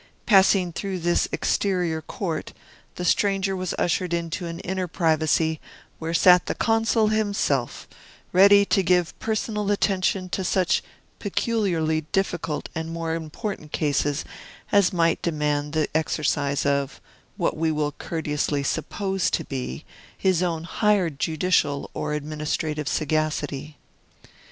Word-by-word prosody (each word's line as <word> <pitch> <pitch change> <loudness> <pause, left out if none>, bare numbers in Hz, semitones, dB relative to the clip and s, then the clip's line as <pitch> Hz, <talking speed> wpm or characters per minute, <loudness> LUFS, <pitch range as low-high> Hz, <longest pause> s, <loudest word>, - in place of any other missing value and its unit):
Passing 190 -3 +4
through 195 +1 -3
this 175 0 +1
exterior 180 -5 0
court, 160 0 -4 0.4
the 180 - -4
stranger 195 +1 +2
was 185 -2 -3
ushered 175 0 0
into 170 +1 -3
an 165 0 -6
inner 185 -1 -2
privacy, 160 -2 +1 0.4
where 160 0 -3
sat 180 +2 +5
the - - -1
Consul 225 -1 +2
himself, 200 - 0 0.4
ready 200 +2 +7
to 195 - +2
give 180 -2 +2
personal 215 -1 -2
attention 190 -2 +1
to 190 - -2
such 185 -1 +2 0.4
peculiarly 185 -7 0
difficult 175 -5 -1
and 160 0 -4
more 165 -1 -3
important 165 +1 -5
cases 145 -1 0 0.5
as 200 -3 +4
might 165 -2 +2
demand 150 -2 -1
the 155 -1 +1
exercise 145 -3 0
of 140 -1 0 0.4
(what - - 0
we 160 0 0
will 150 -1 0
courteously 150 -2 -2
suppose 190 +5 -1
to - - -1
be) 125 - -5 0.3
his 185 -3 +2
own 165 -3 -1
higher 195 0 +1
judicial 155 0 0
or - - -3
administrative 150 0 -3
sagacity. 150 -1 -1
165 Hz, 125 wpm, -24 LUFS, 155-190 Hz, 0.5 s, ready